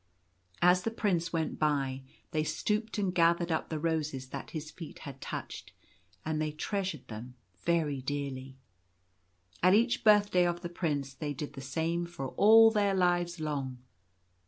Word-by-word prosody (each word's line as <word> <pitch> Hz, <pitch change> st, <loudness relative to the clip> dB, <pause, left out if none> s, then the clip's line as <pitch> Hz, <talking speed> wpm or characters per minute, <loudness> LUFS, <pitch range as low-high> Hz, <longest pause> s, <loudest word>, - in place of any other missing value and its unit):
As 180 Hz, +1 st, +6 dB
the 225 Hz, -, -1 dB
Prince 190 Hz, -6 st, 0 dB
went 165 Hz, -2 st, -2 dB
by, 140 Hz, -3 st, 0 dB, 0.3 s
they 155 Hz, -2 st, +1 dB
stooped 215 Hz, +7 st, -1 dB
and 195 Hz, -3 st, 0 dB
gathered 170 Hz, 0 st, +3 dB
up 160 Hz, -, -1 dB
the 160 Hz, -, -2 dB
roses 150 Hz, -5 st, -2 dB
that 140 Hz, -, -6 dB
his 155 Hz, -1 st, -6 dB
feet 165 Hz, -4 st, -9 dB
had 135 Hz, -2 st, -9 dB
touched; -, -, -6 dB, 0.5 s
and 155 Hz, -1 st, -1 dB
they 155 Hz, -1 st, -1 dB
treasured 185 Hz, -, -3 dB
them 120 Hz, +3 st, -8 dB, 0.2 s
very 155 Hz, -5 st, 0 dB
dearly. 135 Hz, -1 st, -4 dB, 1.0 s
At 185 Hz, +2 st, +6 dB
each 235 Hz, +3 st, +2 dB
birthday 205 Hz, -4 st, +5 dB
of 175 Hz, 0 st, -2 dB
the 175 Hz, -, -5 dB
Prince 145 Hz, -6 st, -2 dB
they 145 Hz, +1 st, -4 dB
did 145 Hz, +2 st, -5 dB
the 135 Hz, -, -8 dB
same 165 Hz, +6 st, -1 dB
for 135 Hz, -6 st, -5 dB
all 225 Hz, -, +7 dB
their 205 Hz, -3 st, +2 dB
lives 175 Hz, -2 st, +1 dB
long. 140 Hz, -4 st, -3 dB
160 Hz, 160 wpm, -31 LUFS, 145-180 Hz, 1.0 s, all